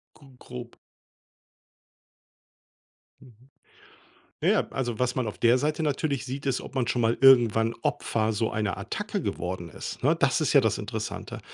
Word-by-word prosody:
Gr 135 -4 -18
grob. 120 -1 -9 2.5
Mhm. 125 +1 -19 0.9
Ja, - - +4
ja, - - +2
also, 120 -4 -2
was 125 +1 0
man 125 -4 -1
auf 105 - -6
der 120 +2 +4
Seite 155 +2 -1
natürlich 140 -2 -1
sieht, 135 +2 -5
ist, 130 -2 0
ob - - -10
man 125 -4 0
schon 120 -1 0
mal 115 +1 +2
irgendwann 115 -4 +5
Opfer 110 -1 0
so 110 +1 0
einer 105 -4 -1
Attacke - - -4
geworden 90 -1 -4
ist, - - -7
ne? 155 +5 +4
Das 140 -2 +1
ist 155 - +1
ja 140 - +7
das 110 -3 0
Interessante 110 -1 -5
125 Hz, 160 wpm, -27 LUFS, 110-135 Hz, 2.5 s, ja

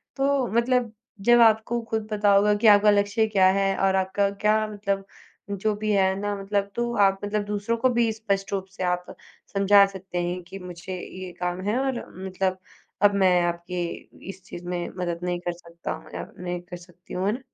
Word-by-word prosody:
तो 275 -2 +1
मतलब 240 -1 +2 0.3
जब 240 +4 +5
आपको 225 +1 +4
खुद 220 -1 -2
पता 205 -1 +3
होगा 205 +1 +5
कि 230 - +5
आपका 210 0 +7
लक्ष्य 205 +2 +2
क्या 195 -3 +4
है, 195 0 +1
और 195 0 +2
आपका 190 +1 +1
क्या 210 +2 +1
मतलब 200 -2 -3 0.4
जो 205 +2 -1
भी 215 +1 -2
है 190 -2 +3
ना 205 0 -2
मतलब 200 0 -2
तो 240 0 -1
आप 195 -2 +3
मतलब 205 0 -1
दूसरों 210 +3 -1
को 255 +3 +3
भी 235 -1 +2
स्पष्ट 200 -3 -2
रूप 190 -1 -1
से 190 - -6
आप 180 0 0 0.5
समझा 200 0 +6
सकते 190 -2 -5
हैं, 180 +1 -3
कि 195 +3 -9
मुझे 180 0 -7
ये 185 0 -8
काम 180 +1 -2
है 215 +4 +1
और 265 -2 -1 0.2
मतलब 190 0 -1 0.5
अब 205 0 +6
मैं 180 -2 +4
आपकी 175 +1 -2 0.5
इस 190 -1 -9
चीज़ 175 - -9
में 175 -1 -2
मदद 175 -2 -2
नहीं 180 0 -1
कर 175 0 -3
सकता 170 0 -8
हूँ 160 0 -11
या - - -5
नहीं 180 0 -3
कर 175 0 -9
सकती 175 0 -15
हूँ, 185 +1 -1
है - - +3
ना? 245 - -5
195 Hz, 200 wpm, -25 LUFS, 180-215 Hz, 0.5 s, आपका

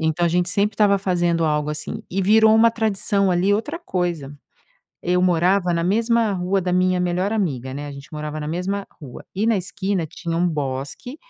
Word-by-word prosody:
Então, 160 +2 +1
a - - +2
gente 175 +1 +1
sempre 205 +3 +1
estava 200 -2 +3
fazendo 175 -3 +1
algo 150 -1 0
assim. 185 +8 -5
E 195 - -1
virou 220 +2 +5
uma 230 +1 +6
tradição 205 -3 0
ali 185 +3 +2
outra 295 +10 -3
coisa, 175 - -3 0.7
eu 180 +1 +1
morava 180 +1 +2
na 170 0 0
mesma 225 +2 +2
rua 190 +1 0
da 180 0 -2
minha 185 0 +2
melhor 180 +3 0
amiga, 135 - -2
né, 145 +1 -5
a 145 - -7
gente 140 0 -11
morava 150 0 -5
na 150 - -4
mesma 190 +4 -3
rua, 135 -5 -10
e 210 +4 0
na 230 -2 +3
esquina 190 -2 -2
tinha 165 +2 -5
um 175 +1 +2
bosque 145 - -4
180 Hz, 195 wpm, -22 LUFS, 165-200 Hz, 0.7 s, uma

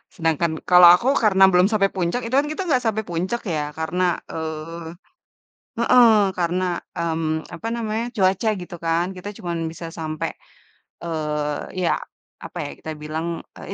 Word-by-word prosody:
Sedangkan 165 -2 +1 0.2
kalo 180 0 +9
aku, 240 - -3 0.2
karena 195 -2 +5
belum 180 +2 +5
sampai 195 -2 +3
puncak 185 +7 -1
itu 230 - -6
kan 295 - 0
kita 345 - -3
gak 250 -2 +2
sampai 220 0 0
puncak 185 +8 -2
ya 150 - 0 0.2
karena, 175 +3 -1 0.3
eee 160 +1 -6 0.9
heeh 240 +1 +6 0.3
karena, 180 +1 0 0.3
mmm, 160 -1 -1
apa 220 +7 -6
namanya, 225 0 -2
cuaca 190 +2 +2
gitu 175 - -8
kan, 165 +1 +2
kita 185 +3 -7
cuman 170 -2 -4
bisa 165 +1 -8
sampai, 155 -1 -3 0.7
eee, 150 +1 -3
ya, - - +2 0.5
apa - - -8
ya - - -5
kita 160 - -7
bilang, 160 +2 -3 0.3
eee, - - -10
175 Hz, 155 wpm, -22 LUFS, 160-200 Hz, 0.9 s, kalo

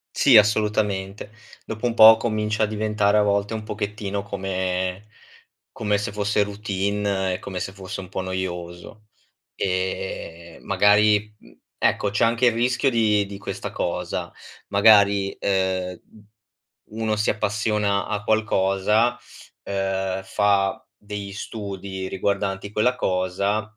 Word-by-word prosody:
Sì, 130 -6 +6
assolutamente, 105 -1 +1 0.3
dopo 110 +2 -5
un 120 - +1
po' 110 -1 +9
comincia 110 -1 -1
a - - +5
diventare 105 -1 +1
a 105 - +5
volte 100 +1 0
un 110 - -4
pochettino 105 -1 -4
come 95 -1 -3 0.7
come 105 -2 -1
se 100 0 -3
fosse 105 0 +1
routine 100 -1 -2
e - - -6
come 95 -2 -6
se 95 - -4
fosse 95 0 -7
un 90 - -11
po' - - -5
noioso. 95 +2 -6 0.5
E 90 -2 -4
magari, 105 +1 +3
mhmm, - - -20 0.2
ecco 100 - +1
c'è 105 - +2
anche 115 +2 +2
il 120 - +5
rischio 125 +3 +1
di 105 -3 +2
di 100 0 -9
questa 100 - -6
cosa, - - -3 0.4
magari, 100 -1 +4
ehm, 95 -2 -1 0.9
u 110 - -8
uno 110 -1 0
si 105 - +1
appassiona 105 -1 0
a 105 -1 -3
qualcosa, 110 +2 +1 0.5
ehm, 95 -1 -2
fa 100 0 0
degli 100 -1 -7
studi 100 -2 -6
riguardanti 100 +1 -2
quella 110 +4 +1
cosa 100 +2 -1
100 Hz, 130 wpm, -23 LUFS, 95-105 Hz, 0.9 s, po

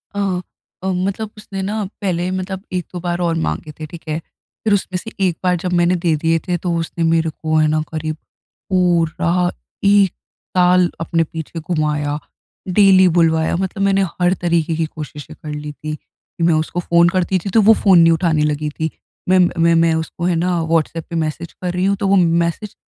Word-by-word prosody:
अ 200 - -1 0.6
अ, - - -2
मतलब 195 +4 -2
उसने 195 -2 -6
ना 210 +2 -2 0.2
पहले 180 -2 -1
मतलब 185 +1 -4
1-2 180 0 -4
बार 175 0 -2
और 170 -1 +1
माँगे 80 - -4
थे, 155 - -4
ठीक 165 +2 -10
है? 155 +1 -2 0.4
फिर 215 - +2
उसमें 190 -2 0
से 225 +5 -7
एक 175 -3 0
बार 180 -1 +3
जब 180 -1 -1
मैंने 175 +1 +3
दे 170 -3 +1
दिए 165 0 +3
थे, 175 -1 0
तो 175 0 -2
उसने 165 0 -3
मेरे 165 0 +2
को, 155 +1 -3
है 155 0 +4
ना, 155 0 +1
करीब 155 -1 -3 0.5
पूरा 175 -1 +2 0.3
1 200 -2 +5 0.5
साल 180 0 +4
अपने 165 0 +1
पीछे 160 +1 -7
घुमाया। 150 -3 -1 0.5
डेली 190 0 +6
बुलवाया, 160 -1 +3
मतलब 190 +2 -2
मैंने 195 0 +3 0.2
हर 175 +1 +4
तरीके 170 -2 +1
की 165 0 0
कोशिशें 150 -2 -9
कर 155 - -7
ली 150 0 -5
थी 155 +1 -6
कि 165 - -10
मैं 170 - +4
उसको 155 +3 -1
फ़ोन 170 0 +4
करती 185 0 0
थी, 195 - -5
तो 225 - +4
वो 215 +2 +7
फ़ोन 190 -5 +5
नहीं 165 0 +6
उठाने 160 -2 +1
लगी 150 +1 -2
थी। 160 0 0 0.4
मैं 185 0 +5 0.2
मैं 165 0 +4
मैं 165 -1 +3
उसको, 160 +2 -4
है 180 -1 +2
ना, 175 +1 0
व्हॉट्सऐप 165 0 0
पे 170 - -5
मैसेज 155 +2 -5
कर 180 -1 -4
रही 180 +1 0
हूँ, 200 +1 +2
तो 200 - -1
वो 195 - +4 0.3
मैसेज 190 +5 -4
170 Hz, 200 wpm, -19 LUFS, 160-185 Hz, 0.6 s, वो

